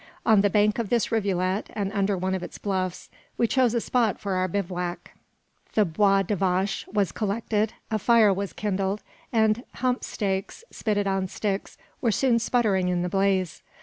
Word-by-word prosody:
On 215 Hz, -3 st, +6 dB
the 205 Hz, -, +3 dB
bank 210 Hz, +3 st, +2 dB
of 225 Hz, -4 st, -2 dB
this 240 Hz, -1 st, +1 dB
rivulet, 195 Hz, -3 st, 0 dB
and 200 Hz, -2 st, -2 dB
under 200 Hz, -1 st, +1 dB
one 185 Hz, +1 st, -1 dB
of 190 Hz, -, -2 dB
its -, -, -7 dB
bluffs, 185 Hz, -3 st, -3 dB, 0.3 s
we 235 Hz, -, +3 dB
chose 245 Hz, 0 st, +2 dB
a -, -, +3 dB
spot 230 Hz, -4 st, +1 dB
for 200 Hz, -2 st, -3 dB
our 185 Hz, 0 st, +1 dB
bivouac. 180 Hz, -2 st, -3 dB, 0.6 s
The 215 Hz, -, +4 dB
bois 195 Hz, +3 st, +3 dB
de 205 Hz, +3 st, -1 dB
vache 190 Hz, +1 st, 0 dB
was 200 Hz, -5 st, +1 dB
collected, 215 Hz, +3 st, -1 dB, 0.2 s
a 215 Hz, -, +1 dB
fire 220 Hz, -2 st, +5 dB
was 200 Hz, 0 st, -3 dB
kindled, 195 Hz, 0 st, -2 dB, 0.3 s
and 220 Hz, 0 st, +2 dB
hump 255 Hz, 0 st, 0 dB
steaks, 195 Hz, -, -3 dB
spitted 205 Hz, -2 st, -1 dB
on 195 Hz, -1 st, 0 dB
sticks, 200 Hz, +1 st, -3 dB, 0.2 s
were 235 Hz, -, +2 dB
soon 240 Hz, +1 st, +2 dB
sputtering 215 Hz, -6 st, +1 dB
in 175 Hz, -1 st, 0 dB
the 180 Hz, -, -1 dB
blaze. 195 Hz, -2 st, 0 dB
200 Hz, 180 wpm, -25 LUFS, 190-220 Hz, 0.6 s, On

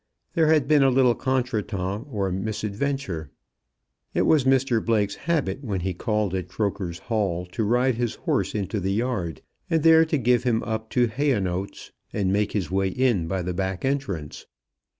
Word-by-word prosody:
There 160 Hz, -2 st, +3 dB
had 155 Hz, -4 st, +3 dB
been 150 Hz, -1 st, +5 dB
a 135 Hz, -, +5 dB
little 130 Hz, -1 st, +4 dB
contretemps 115 Hz, -5 st, -2 dB
or 100 Hz, -6 st, -1 dB
misadventure. 105 Hz, -, -3 dB, 0.9 s
It -, -, +3 dB
was 150 Hz, -5 st, +3 dB
Mr 130 Hz, -3 st, +2 dB
Blake's 105 Hz, -3 st, +1 dB
habit 145 Hz, -, -1 dB
when 100 Hz, -7 st, -2 dB
he 95 Hz, +1 st, -1 dB
called 105 Hz, +1 st, -1 dB
at 90 Hz, -2 st, -2 dB
Croker's 95 Hz, -3 st, -2 dB
Hall 95 Hz, -6 st, -1 dB
to 110 Hz, -, -1 dB
ride 125 Hz, +3 st, +2 dB
his 120 Hz, -2 st, -1 dB
horse -, -, -1 dB
into 100 Hz, 0 st, -2 dB
the 95 Hz, +1 st, -1 dB
yard, 105 Hz, -, -2 dB, 0.3 s
there 160 Hz, 0 st, +6 dB
to 160 Hz, -1 st, 0 dB
give 125 Hz, -1 st, +3 dB
him 120 Hz, -3 st, +1 dB
up 110 Hz, -1 st, -3 dB
to 125 Hz, -, +5 dB
Hayonotes, 105 Hz, -7 st, -2 dB, 0.2 s
and 95 Hz, -2 st, 0 dB
make 105 Hz, 0 st, 0 dB
his 95 Hz, -4 st, -2 dB
way 95 Hz, 0 st, +1 dB
in 105 Hz, -4 st, +1 dB
by 95 Hz, +1 st, -2 dB
the 90 Hz, +1 st, -2 dB
back 95 Hz, +2 st, -2 dB
entrance. 120 Hz, -, -3 dB
110 Hz, 170 wpm, -25 LUFS, 95-130 Hz, 0.9 s, there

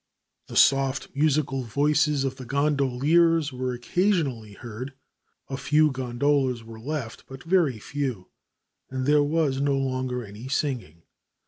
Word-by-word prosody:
The -, -, -9 dB
soft, 135 Hz, 0 st, +3 dB
musical 140 Hz, -2 st, +1 dB
voices 145 Hz, +4 st, +1 dB
of 135 Hz, -1 st, -2 dB
the 130 Hz, -, -8 dB
gondoliers 145 Hz, +3 st, +2 dB
were 130 Hz, 0 st, -2 dB
occasionally 130 Hz, -, 0 dB
heard. 120 Hz, +5 st, -8 dB, 0.5 s
A 135 Hz, -, -4 dB
few 155 Hz, +2 st, +3 dB
gondolas 130 Hz, -1 st, 0 dB
were 115 Hz, 0 st, -11 dB
left, 135 Hz, -2 st, -5 dB
but 135 Hz, 0 st, -10 dB
very 165 Hz, -8 st, +2 dB
few, 125 Hz, -6 st, -4 dB, 0.6 s
and 130 Hz, 0 st, -3 dB
there 150 Hz, +1 st, +5 dB
was 145 Hz, -2 st, +1 dB
no 140 Hz, -1 st, +2 dB
longer 130 Hz, -2 st, -2 dB
any 105 Hz, +5 st, -9 dB
singing. 125 Hz, -, -2 dB
135 Hz, 130 wpm, -25 LUFS, 125-150 Hz, 0.6 s, there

